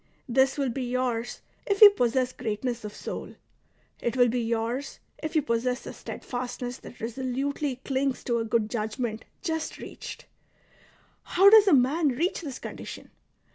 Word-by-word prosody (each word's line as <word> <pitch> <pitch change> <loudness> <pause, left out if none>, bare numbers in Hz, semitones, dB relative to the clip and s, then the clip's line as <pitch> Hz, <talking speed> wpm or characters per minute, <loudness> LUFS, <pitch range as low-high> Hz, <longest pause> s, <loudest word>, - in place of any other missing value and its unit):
This 265 +2 +3
will 275 -2 +1
be 265 - -4
yours 245 -1 -2 0.3
if 400 -1 +1
you 420 -2 +11
possess 255 - +1
greatness 235 +1 -3
of 210 - -5
soul; - - -7 0.7
it 240 +2 -1
will 245 -1 +5
be 245 +1 0
yours 230 +4 -2 0.2
if 315 +1 -4
you 310 - +3
possess 250 -1 0
the - - -7
steadfastness 245 0 -5
that - - -13
resolutely 260 +4 -2
clings 270 -1 0
to 235 -2 0
a - - 0
good 225 -1 +1
judgment 220 0 -3 0.2
just 320 -3 -2
reached. - - -9 1.0
How 390 +3 +5
does 430 -2 +8
a 375 - +6
man 280 +5 +3
reach 310 +9 0
this 280 -6 -6
condition - - -8
250 Hz, 155 wpm, -27 LUFS, 235-280 Hz, 1.0 s, you